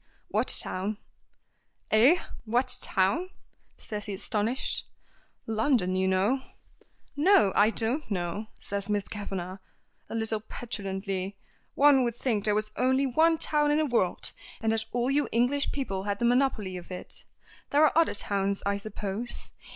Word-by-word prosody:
"What - - +1
town?" 200 +3 0 0.9
"Eh? 245 +11 +6 0.3
What 240 +4 +3
town?" 235 - +1 0.5
says 210 -1 -5
he 205 - -4
astonished. 215 +5 -2 0.6
"London, 220 -4 +1
you 190 0 +1
know." 195 +8 +2 0.7
"No, 290 - +5
I 210 +1 +5
don't 235 +7 -1
know," 190 +2 -3
says 200 0 -4
Miss 205 -1 0
Kavanagh, 195 -3 -5 0.5
a - - -5
little 220 -1 -1
petulantly. 195 -3 -4 0.4
"One 280 -2 +6
would 235 -2 -1
think 225 -5 -1
there 210 -1 +3
was 215 0 -1
only 260 +2 +2
one 320 +5 +3
town 295 -1 +1
in 295 - +3
the 310 - +2
world, 235 -10 0 0.3
and 225 0 +1
that 220 -1 0
all 245 +2 0
you 290 +1 +1
English 250 +5 +1
people 195 -9 -3
had 200 -1 -1
the 235 - 0
monopoly 235 -7 +1
of 175 - -10
it. 180 - -7 0.5
There 295 +2 +5
are - - +2
other 330 -7 +3
towns, 200 -1 -1
I 200 0 +1
suppose. 205 +2 -5
220 Hz, 150 wpm, -28 LUFS, 200-260 Hz, 0.9 s, Eh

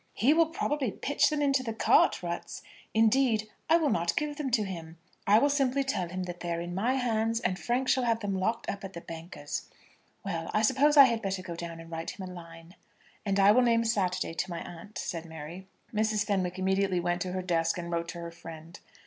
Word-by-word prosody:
"He 265 +7 +4
will 330 0 +4
probably 295 -5 -1
pitch 285 +8 +1
them 300 -1 0
into 275 -2 +3
the 225 -3 -4
cart - - +4
ruts. - - -5 0.3
Indeed, 225 0 +3 0.2
I 330 - +7
will 310 -5 +1
not 170 -5 +1
give 295 -1 -2
them 290 -3 -2
to 230 -3 +2
him. 170 -4 -7 0.3
I 205 +2 +7
will 280 - +4
simply 275 -1 +1
tell 185 -10 -2
him 185 +1 -4
that 175 -1 -6
they 175 - -4
are 170 - -1
in 175 +1 -5
my 230 +8 +1
hands, 225 -3 0
and 185 -3 -1
Frank 250 +2 0
shall 255 -1 +2
have 230 -1 +2
them 205 -2 -2
locked 220 +5 -1
up 200 0 -4
at 195 0 -7
the 170 - -7
banker's. 165 +2 -7 0.6
Well; 165 -4 -3
I 215 - +3
suppose 285 +6 +4
I 280 - +12
had 230 -3 0
better 195 -2 -3
go 175 -2 -6
down 170 -1 -6
and 165 0 -11
write 165 0 -4
him 190 - -5
a 180 - -8
line." 165 0 -12 0.5
"And 200 0 +1
I 195 +1 +7
will 250 +4 +5
name 230 -1 +3
Saturday 185 -6 0
to 185 +3 -2
my 170 -1 -4
aunt," 175 +5 -10
said 165 -1 -4
Mary. 160 +4 -9 0.3
Mrs. 215 -1 +1
Fenwick 185 -3 -1
immediately 190 0 +1
went 175 0 -1
to 180 -1 -3
her 185 0 -2
desk, 165 -2 +1
and 170 0 -5
wrote 170 0 -1
to 170 +1 -6
her 170 0 -6
friend. 165 0 -11
195 Hz, 230 wpm, -29 LUFS, 170-235 Hz, 0.6 s, I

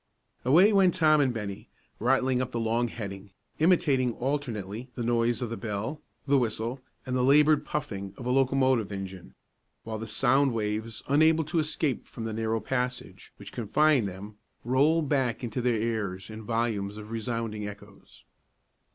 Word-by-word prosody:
Away 175 - +6
went 190 -3 +4
Tom 155 -4 +4
and 135 -3 +2
Bennie, 105 -4 -6 0.3
rattling 130 +1 +2
up 130 - -2
the 120 - -3
long 115 +2 +1
heading, 100 -4 -7 0.3
imitating 145 -7 +3
alternately 120 -4 -3
the 120 - -3
noise 120 +1 +1
of 115 - -4
the 115 - -3
bell, 110 +7 -4 0.2
the 140 -1 +4
whistle, 115 +2 -2 0.2
and 130 - -2
the 125 - +2
labored 150 +3 +5
puffing 100 -10 -4
of 125 - -8
a 125 - 0
locomotive 130 -4 +2
engine; 95 -2 -7 0.5
while 110 -1 -5
the 110 - -6
sound 135 +4 +2
waves, 110 0 -3
unable 160 +3 +4
to 155 +2 -1
escape 155 -3 -1
from 115 - -8
the 110 -1 -3
narrow 110 0 -1
passage 125 +3 -4
which - - -10
confined 130 +1 +2
them, 100 +3 -9 0.3
rolled 145 +5 +3
back 130 -4 0
into 120 +1 -3
their 120 -1 +2
ears 105 -4 -2
in 110 +1 -8
volumes 110 -3 -2
of 105 +1 -9
resounding 115 -2 -3
echoes. 100 0 -13
120 Hz, 160 wpm, -28 LUFS, 110-135 Hz, 0.5 s, Away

